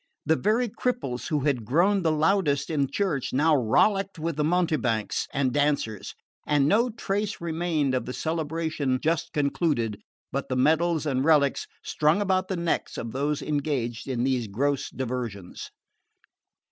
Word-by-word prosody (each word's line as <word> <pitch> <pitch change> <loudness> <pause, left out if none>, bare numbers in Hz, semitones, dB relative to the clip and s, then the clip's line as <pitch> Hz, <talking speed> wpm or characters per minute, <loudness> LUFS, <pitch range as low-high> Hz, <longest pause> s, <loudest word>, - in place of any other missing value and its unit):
The 160 - +3
very 220 +8 +1
cripples 200 - -3
who 150 -2 0
had 135 -4 0
groaned 180 - +2
the 160 - +3
loudest 155 -3 +1
in 140 -4 +1
church 170 -10 -1
now 150 +4 +4
rollicked 195 - +2
with 165 0 -2
the 150 - 0
mountebanks 155 - 0
and 135 -3 0
dancers; 145 -8 -1 0.3
and 145 -2 +3
no 230 +8 +3
trace 210 -2 -2
remained 160 -4 -1
of 130 - -1
the - - -3
celebration 160 -4 -1
just 165 +2 -1
concluded 140 - 0 0.3
but 140 - -3
the 130 - -1
medals 160 +3 +2
and 135 -3 0
relics 145 -3 +3 0.2
strung 155 +5 +2
about 190 -2 +1
the 190 - -2
necks 170 -1 -1
of 115 - -4
those 145 +3 -1
engaged 135 -6 -2
in 125 -3 -1
these 130 -3 0
gross 135 +7 -1
diversions. 120 -7 -5
150 Hz, 150 wpm, -26 LUFS, 130-170 Hz, 0.3 s, now